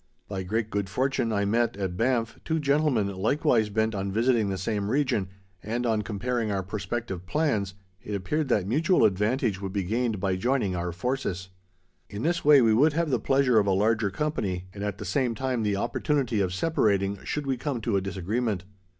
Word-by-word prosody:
By 95 -2 -4
great 110 +4 -2
good 100 -1 -2
fortune 130 +1 0
I 100 -1 +1
met, 115 +1 +1
at 95 -3 -3
Banff, 115 +1 0
two 160 - 0
gentlemen 140 -6 +2
likewise 110 +1 +2
bent 110 +2 0
on 100 -1 -2
visiting 115 0 +2
the 95 - -2
same 100 +2 -2
region, 125 -7 +1 0.3
and 120 +3 -2
on 110 -2 +1
comparing 110 +2 -2
our 95 -1 -1
prospective 100 -1 -4
plans, 110 -12 0 0.3
it 105 - -4
appeared 150 +11 -1
that 105 -7 +1
mutual 160 - +3
advantage 105 +1 +1
would 95 -1 -4
be 100 -2 0
gained 110 +2 -1
by 95 -1 0
joining 120 -3 0
our 85 0 -2
forces. 95 -2 -3 0.6
In 100 +2 -5
this 170 +2 0
way 145 -3 +7
we 110 -1 +4
would 145 +7 +4
have 165 -1 0
the 125 - +2
pleasure 135 -1 +3
of 100 - +1
a - - +3
larger 105 +2 +2
company, 95 -6 -2
and 100 - -6
at 105 -2 -3
the - - -7
same 130 -5 0
time 130 -2 -1
the 105 -2 0
opportunity 125 +1 0
of 95 -2 0
separating, 100 - 0
should 150 -1 -3
we 135 -1 0
come 130 0 -3
to 110 -1 0
a 95 - +2
disagreement. 100 +2 -2
110 Hz, 195 wpm, -27 LUFS, 100-130 Hz, 0.6 s, way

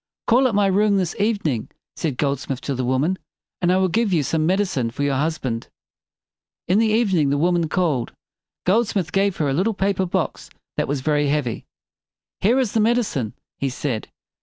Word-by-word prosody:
"Call 255 +3 +4
at 230 - -1
my 205 0 +4
room 200 +1 +3
this 180 -3 -1
evening," 200 - 0 0.3
said 145 -6 -2
Goldsmith 140 -2 -1
to 140 - -2
the 130 0 -2
woman, 135 +9 +1 0.4
"and 175 0 +3
I 185 - +3
will 190 0 +3
give 220 +3 +1
you 165 -5 +2
some 155 +3 0
med 190 +3 +2
i - - +4
cine 130 - -2
for 145 - -3
your 140 -1 +1
husband." 130 -6 -2 1.0
In 185 +4 +3
the 225 - +3
evening 200 -9 +2
the 140 - +1
woman 170 +1 +2
called. 155 -11 0 0.5
Goldsmith 195 -4 +1
gave 195 -1 +1
her 150 - 0
a 135 - +1
little 195 +9 +1
paper 195 -1 0
box - - -2 0.3
that - - 0
was 140 -1 -1
very 145 +1 +1
heavy. 140 -5 -1 0.7
"Here 230 +6 +3
is 255 -6 +1
the 225 - +1
med 230 +3 +3
i - - +3
cine," 130 - -3 0.3
he 135 - 0
said. 125 -3 -3
175 Hz, 200 wpm, -22 LUFS, 140-200 Hz, 1.0 s, Call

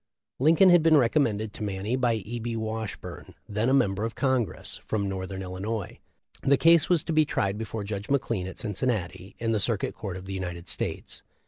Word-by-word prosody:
Lincoln 165 +7 +6
had 175 -1 +7
been 160 -1 +6
recommended 115 -5 +2
to - - -6
Manny 100 +3 -2
by 125 -2 +2
E. 110 +3 -5
B. 115 0 -3
Washburne, 110 -1 -5
then 105 +4 0
a - - +3
member 100 -6 +2
of 115 0 -3
Congress 125 -2 -1
from 100 -2 -1
north 95 0 -4
ern 95 0 -5
Illinois. 95 +3 -4 0.4
The 140 0 +4
case 165 +4 +5
was 175 -4 +3
to 165 - -2
be 155 0 +5
tried 100 -9 -1
before 110 -1 -4
Judge 100 0 -5
McLean 115 -9 0
at 95 - -8
Cincinnati, 100 -4 -2
in 115 -1 -1
the 110 - +2
Circuit 105 0 0
Court 95 -4 -6
of 95 - -9
the 95 - -5
United 90 -2 -5
States. - - -4
110 Hz, 200 wpm, -27 LUFS, 95-130 Hz, 0.4 s, had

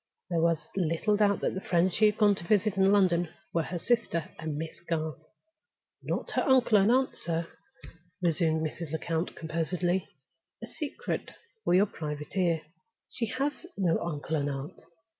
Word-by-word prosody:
There 165 -1 +2
was 165 -1 +1
little 180 +3 +1
doubt 205 -1 +3
that - - 0
the 190 - -4
friends 175 0 +2
she 215 - +5
had 210 0 0
gone 210 -2 +5
to 190 - -7
visit 205 +2 +2
in 195 0 +4
London 175 -4 +3 0.2
were 170 - +2
her 175 +3 -4
sister 185 -5 0
and 160 -3 -3
Miss 160 +1 -5
Garth. 160 -4 -3 0.8
"Not - - -3
her - - +1
uncle 250 -6 +5
and 195 +3 +4
aunt, 260 +1 +2
sir," 165 0 -2 0.7
resumed 160 -2 +1
Mrs. 160 0 -5
Lecount, 165 +2 -2
composedly. 175 +3 -1 0.6
"A - - -2
secret 320 - -4 0.3
for - - +3
your 195 +3 +6
private 150 -5 -6
ear! 170 -4 +2 0.5
She 230 - -2
has 285 +8 -2
no 175 -4 +2
uncle 160 -1 -3
and 145 -1 0
aunt. 140 +5 -6
175 Hz, 165 wpm, -29 LUFS, 160-205 Hz, 0.8 s, your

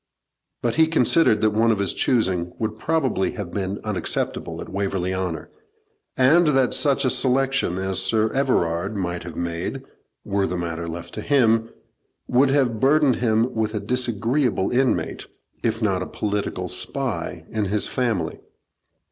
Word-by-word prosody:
But 120 +2 0
he 160 0 +5
considered 165 -6 +3
that 110 - +3
one 110 +2 +2
of 110 - +1
his 100 -1 0
choosing 95 -8 +1
would 110 -1 -3
probably 135 -12 0
have 100 -5 -6
been 100 0 -3
unacceptable 105 -4 -2
at - - -7
Waverley 95 -2 -1
Honour, 90 -4 -4 0.7
and 155 +7 +5
that 135 -4 +3
such 140 -2 +2
a - - +3
selection 135 -7 +1
as 95 0 0
Sir 110 +3 +1
Everard 100 -8 0
might 90 -2 -3
have 85 -1 -8
made, 85 -1 -4 0.4
were 100 0 0
the 90 - -3
matter 85 -1 -4
left 85 +1 -7
to - - -4
him, 115 -5 +2 0.6
would 130 +2 +3
have 130 -5 +1
burdened 140 0 +3
him 115 0 +1
with 110 -1 -1
a - - 0
disagreeable 120 0 0
inmate, 130 +1 0 0.3
if 115 0 -1
not 95 -4 +1
a 90 - -4
political 100 -3 -3
spy, 90 -3 -2
in 110 -2 -1
his 100 +2 +1
family. 110 -11 -2
110 Hz, 155 wpm, -23 LUFS, 95-130 Hz, 0.7 s, he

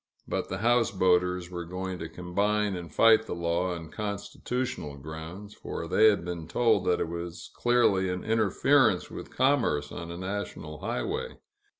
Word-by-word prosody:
But - - -2
the - - -3
houseboaters 90 -6 +2
were 85 -1 -4
going 90 +1 -5
to 80 - -5
combine 100 +4 0
and 85 -3 -7
fight 110 +4 +5
the - - -3
law 85 +1 0
on 80 -2 -9
constitutional 105 - -4
grounds, 80 +8 -8
for 85 - -6
they 110 +6 +5
had 100 -5 +3
been 85 -3 -5
told 115 -1 +2
that 90 -1 +2
it - - 0
was 85 +1 -6
clearly 110 -6 +3
an 90 0 -3
interference 110 0 +3
with - - -7
commerce 125 - +1
on 85 -1 -6
a 85 - -6
national 95 -5 -5
highway. - - -3
90 Hz, 160 wpm, -28 LUFS, 85-105 Hz, -, fight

